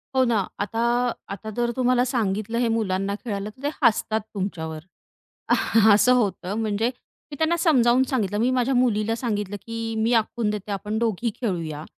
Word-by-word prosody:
हो 260 - +5
ना, 220 -6 +1
आता 225 +3 -2 0.5
आता 210 +2 -6
जर 240 0 +1
तुम्हाला 250 0 +3
सांगितलं 220 -3 -1
हे, 240 -1 +2
मुलांना 200 -3 0
खेळायला 205 -3 -3
तर 255 +6 -17
ते 290 - +1
हसतात 220 -2 +2
तुमच्यावर. 165 -6 -4 1.2
असं 215 +5 +5
होतं 205 -5 0
म्हणजे 220 +1 0 0.4
मी 290 - -7
त्यांना 320 +2 +2
समजावून 260 -7 +4
सांगितलं, 205 -6 0
मी 240 +4 +2
माझ्या 255 +1 +1
मुलीला 225 -3 +2
सांगितलं, 205 -4 -2
की 230 0 -4
मी 225 +2 +1
आखून 225 -1 +1
देते 210 0 -5
आपण 210 +3 -3
दोघी 230 0 0
खेळूया. 165 - -3
225 Hz, 160 wpm, -24 LUFS, 205-245 Hz, 1.2 s, हो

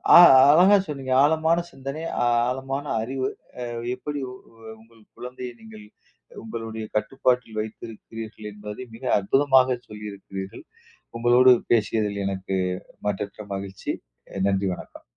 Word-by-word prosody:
அ - - +12 0.3
அழகா 185 +6 +7
சொன்னீங்க. 135 -3 -5
ஆழமான 160 +3 +3
சிந்தனை, 135 +3 -6 0.5
ஆழமான 135 +2 -3 0.2
அறிவு 130 +3 -2 0.3
அ - - -2 0.3
எப்டி 145 +3 -5 0.6
உங்கள் 115 0 -21
குழந்தையை, 125 0 -7
நீங்கள் 110 -1 -12 0.6
உங்களுடைய 110 -1 -6
கட்டுப்பாட்டில் 125 0 0
வைத்திருக்கிறீர்கள் 110 0 -8
என்பதை 105 +3 -8
மிக 115 - -11
அற்புதமாக 130 +4 +3
சொல்லியிருக்கிறீர்கள். 100 -2 -8 0.5
உங்களோடு 120 +2 +6 0.2
பேசியதில் 105 -2 +1
எனக்கு 95 -1 -2 0.5
மற்றற்ற 100 +1 -4
மகிழ்ச்சி. 95 -1 -5 0.4
அ - - -3
நன்றி 95 0 +1
வணக்கம். - - -12
115 Hz, 105 wpm, -24 LUFS, 105-130 Hz, 0.6 s, அ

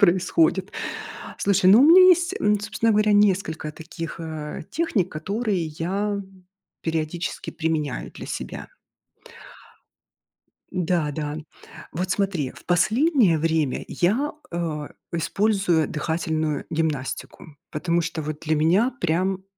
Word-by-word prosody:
происходит. 185 0 +3 0.7
Слушай, 195 -2 +4
ну, 215 +5 +8
у - - +7
меня 340 +5 +9
есть, 355 +1 +4
м, 210 0 +3
собственно 220 +2 0
говоря, 210 0 +3
несколько 185 -7 +2
таких, 165 +2 -7
а, 155 -2 -5
техник, 240 - 0
которые 195 +2 -2
я 195 +6 -2 0.6
периодически 165 +1 -3
применяю 155 -5 -2
для - - -9
себя. - - -6 2.0
Н-да, 170 -4 0
да. 150 0 -4 0.5
Вот 180 +3 -3
смотри, 180 -9 0
в - - -15
последнее 215 - +3
время 160 -3 0
я, 235 +12 +1 0.2
а, 160 -4 -3 0.2
использую 180 -1 +1
дыхательную 155 -1 -1
гимнастику, 155 -1 -3
потому 170 +2 0
что 160 -1 -3
вот 150 0 -5
для 160 0 0
меня 180 +11 +3
прям 185 +3 0
170 Hz, 115 wpm, -24 LUFS, 160-200 Hz, 2.0 s, меня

